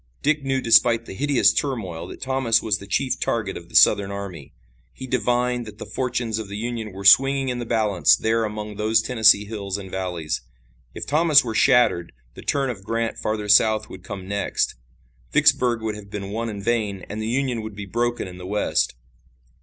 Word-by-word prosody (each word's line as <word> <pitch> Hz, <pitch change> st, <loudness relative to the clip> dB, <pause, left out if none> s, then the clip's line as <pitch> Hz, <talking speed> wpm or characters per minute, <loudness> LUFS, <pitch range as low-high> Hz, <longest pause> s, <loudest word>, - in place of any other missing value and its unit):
Dick 155 Hz, +1 st, +2 dB
knew 135 Hz, -1 st, -1 dB
despite 115 Hz, 0 st, +4 dB
the -, -, -8 dB
hideous 125 Hz, -3 st, +3 dB
turmoil 110 Hz, -, -3 dB
that -, -, -9 dB
Thomas 130 Hz, -4 st, +1 dB
was 105 Hz, -2 st, -1 dB
the 100 Hz, -, -11 dB
chief 130 Hz, +6 st, -1 dB
target 110 Hz, -4 st, -2 dB
of 85 Hz, 0 st, -10 dB
the -, -, -13 dB
Southern 100 Hz, -2 st, +5 dB
army. 100 Hz, -7 st, -7 dB, 0.4 s
He 130 Hz, -, -8 dB
divined 125 Hz, -1 st, 0 dB
that 105 Hz, -1 st, -11 dB
the -, -, -8 dB
fortunes 120 Hz, -3 st, -2 dB
of 110 Hz, -, -6 dB
the 100 Hz, -, -6 dB
Union 115 Hz, -1 st, -4 dB
were 95 Hz, +1 st, -9 dB
swinging 135 Hz, +5 st, +5 dB
in 125 Hz, -1 st, -3 dB
the 120 Hz, -, -5 dB
balance 100 Hz, -, +3 dB
there 115 Hz, -, 0 dB
among 105 Hz, -1 st, -5 dB
those 110 Hz, +1 st, +2 dB
Tennessee 110 Hz, -3 st, +4 dB
hills 100 Hz, -2 st, -5 dB
and 95 Hz, -2 st, -9 dB
valleys. 85 Hz, -7 st, -3 dB, 0.5 s
If -, -, -6 dB
Thomas 155 Hz, 0 st, +4 dB
were 115 Hz, -2 st, -4 dB
shattered 120 Hz, -9 st, +3 dB, 0.2 s
the -, -, -11 dB
turn 135 Hz, -2 st, -1 dB
of 100 Hz, -5 st, -10 dB
Grant 115 Hz, +2 st, -2 dB
farther 110 Hz, -1 st, -3 dB
south 110 Hz, +1 st, +4 dB
would 95 Hz, -, -10 dB
come 95 Hz, -2 st, -8 dB
next. 100 Hz, 0 st, -1 dB, 0.6 s
Vicksburg 120 Hz, -3 st, +3 dB
would 110 Hz, -1 st, -2 dB
have 105 Hz, -1 st, -11 dB
been 100 Hz, -1 st, -6 dB
won 115 Hz, +2 st, -3 dB
in 100 Hz, -2 st, -7 dB
vain 105 Hz, -5 st, -1 dB
and 110 Hz, +1 st, -6 dB
the 110 Hz, -, -3 dB
Union 125 Hz, -1 st, -1 dB
would 110 Hz, -1 st, -8 dB
be 105 Hz, -1 st, -7 dB
broken 120 Hz, +3 st, -2 dB
in 90 Hz, 0 st, -10 dB
the 90 Hz, -, -8 dB
West. 105 Hz, -10 st, 0 dB
110 Hz, 200 wpm, -23 LUFS, 100-120 Hz, 0.6 s, Southern